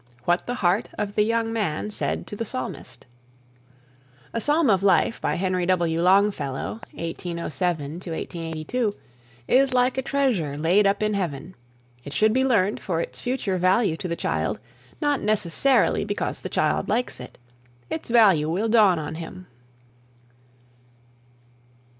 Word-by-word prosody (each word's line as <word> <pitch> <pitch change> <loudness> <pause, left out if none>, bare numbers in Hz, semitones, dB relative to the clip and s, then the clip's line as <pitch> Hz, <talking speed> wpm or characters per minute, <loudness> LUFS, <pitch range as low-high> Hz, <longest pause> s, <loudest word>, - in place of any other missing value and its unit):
WHAT 175 +1 +1
THE 245 - -2
HEART 190 -3 +1
OF 205 -1 -3
THE 210 - +2
YOUNG 225 +1 +1
MAN 210 -2 -2
SAID - - -2
TO - - -8
THE 230 - -3
PSALMIST. 130 - -6 1.3
"A 230 - -1
Psalm 295 +3 +2
of 190 -2 +2
Life," 195 +3 +2
by - - 0
Henry 185 -1 -1
W. 170 -3 +1
Longfellow 190 -3 +1
(1807 170 -2 -3
82), 165 +7 -3 0.5
is 260 0 +3
like 250 +1 +2
a - - +1
treasure 250 - 0
laid 180 +7 +3
up 200 +2 +1
in 215 0 +1
heaven. 180 -3 -3 0.5
It 140 - -8
should 215 +4 +3
be 260 +2 +2
learned 210 -6 +2
for 170 -4 -2
its - - -5
future 245 -7 -1
value 185 0 +3
to 185 - -4
the 170 - -2
child, - - -1 0.4
not 290 -3 +1
necessarily 215 +5 +2
because - - -3
the - - -6
child - - 0
likes 250 - -1
it. 125 - -10 0.5
Its 160 - -4
value 195 -10 +5
will 200 +7 0
dawn 210 -6 +5
on 155 0 -4
him. 170 +3 -8
195 Hz, 145 wpm, -24 LUFS, 170-225 Hz, 1.3 s, value